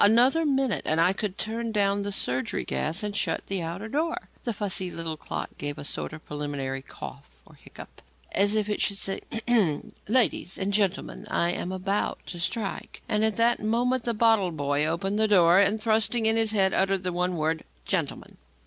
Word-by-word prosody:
Another 250 +10 +5
minute 270 -5 +1
and 155 +1 +2
I 175 +3 +4
could 205 -1 -4
turn 225 +1 -2
down 200 -1 +2
the 205 0 -3
surgery 130 -9 -1
gas 110 - -1
and 205 -1 -3
shut - - 0
the 195 -2 -2
outer 170 +6 -4
door. 315 +7 -2 0.2
The 240 - 0
fussy 195 -3 -2
little 165 -2 -3
clock - - -5
gave 145 0 -3
a - - -6
sort 145 - -2
of 155 0 -10
preliminary 145 -2 -4
cough 135 - -10 0.2
or - - -18
hiccup, - - -13 0.3
as 205 +2 +2
if 215 -1 +1
it 210 - -1
should 200 - +2
say: 195 -1 -2 0.3
"Ahem! 205 -12 +1
ladies 215 -5 +1
and 200 +1 -2
gentlemen, 200 -2 -1
I 170 - +1
am 180 +1 -3
about 195 +2 -1
to 175 - -6
strike." 200 +4 -3
And 210 0 +1
at 220 -2 +2
that 235 +1 +3
moment, 240 +3 +1
the 235 -1 +1
bottle 220 -4 +4
boy 145 -1 0
opened 195 +6 -1
the 220 - +4
door 180 -3 +6
and, 200 +2 +3
thrusting 220 +1 +1
in 220 0 +4
his 225 -1 +4
head, 195 -3 +3
uttered 195 0 +1
the 180 -1 -1
one 180 0 0
word: 160 +1 0 0.2
"Gentleman." - - -2
200 Hz, 195 wpm, -27 LUFS, 170-220 Hz, 0.3 s, door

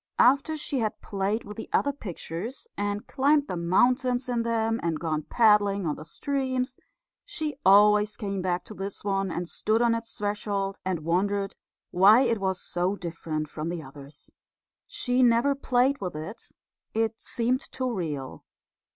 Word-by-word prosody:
After 280 +5 +4
she 285 -2 -1
had 215 -2 -2
played 200 +2 -1
with 210 0 -9
the 225 - -7
other 285 - +2
pictures, 210 - -6
and 205 0 -2
climbed 285 +2 +2
the - - -3
mountains 245 +8 +2
in 240 -2 0
them, 225 0 0
and 165 -2 -1
gone 155 -2 -1
paddling 205 0 +3
in 155 - 0
the 155 - -9
streams, 260 - -2 0.5
she 315 -8 -3
always 210 +2 +5
came 200 -3 -3
to 180 +3 -2
this 195 -1 -5
one 195 -1 0
and 175 0 -3
stood 215 +5 +1
on 235 -1 +3
its 230 0 -4
threshold 205 -1 -2
and 185 -3 -2
wondered 195 +3 0 0.4
why 200 +7 +7
it 235 -4 +1
was 190 -1 -1
so 180 +3 -1
different 165 -4 -4
from 155 +2 -5
the 170 -2 -4
others. 140 +1 -12 0.6
She 250 0 0
never 240 +3 +4
played 265 -1 +1
with 180 -4 -4
it. 160 +9 -7 0.4
It 225 0 0
seemed 245 +2 0
too 255 -2 -2
real. 150 - -4
205 Hz, 160 wpm, -27 LUFS, 180-245 Hz, 0.6 s, why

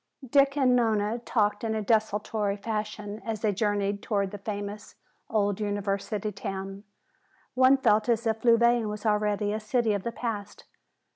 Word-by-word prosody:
Dick 275 +2 +3
and 255 -3 +4
Nona 220 -1 +1
talked 210 -3 0
in 220 -1 -1
a 215 - -1
desultory 210 -1 0
fashion 210 0 -4
as 220 -2 -4
they 215 - +2
journeyed 205 0 0
toward 200 -3 -1
the 205 - -7
famous 205 0 -6 0.3
old 205 -2 +1
university 205 0 -2
town. 195 0 -6 0.7
One 260 +1 +5
felt 220 -3 +2
as 235 0 +1
if 220 0 -1
Louvain 235 -1 +4
was 210 +1 -6
already 210 -1 +1
a 215 - -2
city 225 0 +1
of 200 - -1
the 235 - -3
past. 225 -4 -5
210 Hz, 155 wpm, -27 LUFS, 205-230 Hz, 0.7 s, One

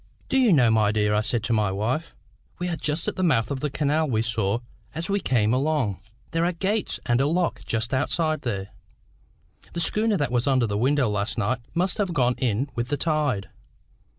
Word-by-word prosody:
"Do 265 - +3
you 240 -5 +5
know, 125 -8 +5
my 110 -2 +3
dear," 105 -1 +1
I 105 - +3
said 110 +1 -1
to 120 - 0
my 105 -3 +2
wife, 120 +12 -2 0.4
"we 180 - -3
are 170 - -1
just 155 +1 -2
at - - -2
the 185 - 0
mouth 140 -8 +2
of 140 - -2
that 145 0 -3
canal 155 +1 +1
we 110 -3 +1
saw 110 -2 0 0.4
as 170 +5 -3
we 200 - +2
came 115 - +2
along? 130 -7 0 0.3
There 165 0 +1
are 175 - +2
gates 200 +5 -1
and 120 +2 +2
a 140 - +2
lock 175 +3 0
just 115 +2 -1
outside 155 +4 0
there. 100 -6 -3 1.0
The 170 - -3
schooner 210 +5 +1
that 145 -6 -1
was 125 +1 +1
under 130 -3 +3
this 105 -2 -2
window 135 +1 +2
last 105 +2 -2
night 120 +3 0 0.2
must 180 +4 0
have 185 -4 0
gone 125 -2 +3
in 125 +1 0
with 120 0 -2
the 145 - -1
tide. 150 -11 0
130 Hz, 210 wpm, -25 LUFS, 110-165 Hz, 1.0 s, you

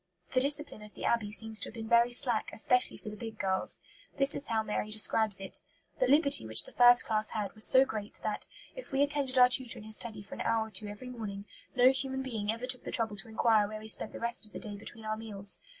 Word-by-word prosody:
The 255 - +3
discipline 285 -4 0
of 210 0 -12
the - - -7
Abbey 230 -3 0
seems 220 +1 -1
to - - -1
have - - -15
been 225 -1 -7
very 235 +1 +3
slack, 240 -2 +1
especially 250 +3 +2
for 215 - -9
the 210 - -9
big 225 -1 -9
girls. 190 -1 -1 0.4
This 275 0 +4
is 280 - -1
how 220 -1 -1
Mary 210 0 -4
describes 215 -1 +2
it: 195 - -7 0.4
"The - - +2
liberty 280 - +6
which 110 0 +6
the - - -15
first 245 0 +7
class 215 -1 0
had 210 -3 -5
was 215 0 +4
so 260 +1 +5
great 215 -4 -7
that, 215 - -4 0.3
if - - -11
we 275 +1 +2
attended 285 -2 -1
our 250 0 +7
tutor 255 -1 -1
in - - -11
his 220 0 0
study 215 -4 -9
for 200 - -12
an - - -7
hour 220 -1 -1
or - - -23
two 210 0 -1
every 210 +5 -9
morning, 205 -4 -7 0.3
no 255 +1 +5
human 265 0 -4
being 220 -5 -3
ever 230 +2 -6
took 255 -1 -3
the - - -8
trouble 225 -3 -2
to 195 - -7
enquire 220 -1 +2
where 215 +1 -7
we 215 - -11
spent 220 - 0
the - - -9
rest 235 +1 -3
of 215 - -13
the - - -7
day 210 -3 -8
between 220 +2 -12
our 215 0 -2
meals. 205 -3 +1
225 Hz, 260 wpm, -30 LUFS, 215-250 Hz, 0.4 s, first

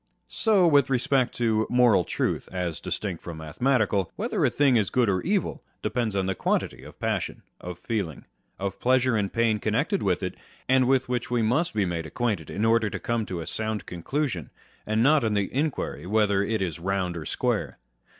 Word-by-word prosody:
So 210 -5 +3
with 145 -5 +4
respect 130 0 +1
to 110 -2 +1
moral 120 -7 +4
truth - - -2
(as 90 -4 -3
distinct 95 -6 -4
from 85 -2 -7
mathematical), 100 - 0
whether - - -1
a - - +5
thing 140 -3 +3
is 105 -4 +2
good 125 -2 +2
or 95 -2 +1
evil, 195 -1 -1 0.2
depends 115 -3 -1
on 95 -1 +1
the 95 - 0
quantity - - -1
of - - -13
passion, - - -2 0.2
of 90 -1 -7
feeling, 100 - -3 0.3
of 100 0 -4
pleasure 130 -1 +3
and 100 -3 0
pain 115 -2 +2
connected - - 0
with - - 0
it, - - -2 0.3
and 130 -1 +4
with 130 0 +2
which 125 -1 -2
we 120 -2 +1
must 125 +7 +1
be 105 -2 +2
made 85 -2 -3
acquainted 100 -7 -2
in 105 - -1
order 115 -1 +3
to - - -4
come 115 -3 -1
to 90 -2 -4
a - - -6
sound 110 +1 -3
conclusion, 90 - -3 0.4
and 110 +1 +2
not 150 +1 +5
on 110 -2 +1
the 100 -2 -1
inquiry 135 - -2
whether 105 -1 +2
it 110 -1 0
is 85 -3 -4
round 95 0 -1
or 80 -2 -6
square. - - -1
110 Hz, 195 wpm, -26 LUFS, 95-125 Hz, 0.4 s, a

